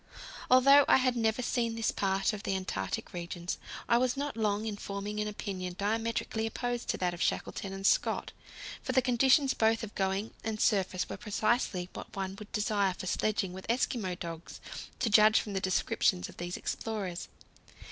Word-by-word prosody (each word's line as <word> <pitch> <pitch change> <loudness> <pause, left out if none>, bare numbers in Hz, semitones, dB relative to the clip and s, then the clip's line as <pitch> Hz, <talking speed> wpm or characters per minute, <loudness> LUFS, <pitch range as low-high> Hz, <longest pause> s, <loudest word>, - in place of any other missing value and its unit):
Although 275 +3 +8
I - - +7
had 255 -1 +2
never 225 +1 +1
seen 235 -2 0
this 225 -1 +1
part 195 +1 +1
of 210 - -5
the 195 - -1
Antarctic 95 - -3
regions, 175 0 -4 0.3
I 235 - +4
was 255 +1 +1
not 285 -3 -2
long 215 -1 0
in 215 -2 -2
forming 205 +1 -4
an 210 - 0
opinion 190 -4 -4
diametrically 225 +1 -1
opposed 245 +1 -3
to - - +1
that 180 -1 0
of 175 - -7
Shackleton 195 - -1
and 195 0 -6
Scott, - - +2 0.5
for - - -3
the 260 - +5
conditions 265 +3 +4
both 225 +1 +2
of 215 - -6
going 195 +3 -1
and 220 -1 -3
surface 190 -4 +1
were - - -6
precisely 215 -3 0
what - - -9
one 190 -1 -3
would 210 0 -10
desire 205 -3 +1
for - - -7
sledging 195 0 0
with 190 +1 -9
Eskimo 230 -6 0
dogs, 170 -1 -7 0.4
to - - 0
judge 215 0 +6
from 205 - -5
the 190 - -1
descriptions 180 - +1
of - - -14
these 175 0 -4
explorers. 200 -6 -4
210 Hz, 180 wpm, -31 LUFS, 190-230 Hz, 0.5 s, Although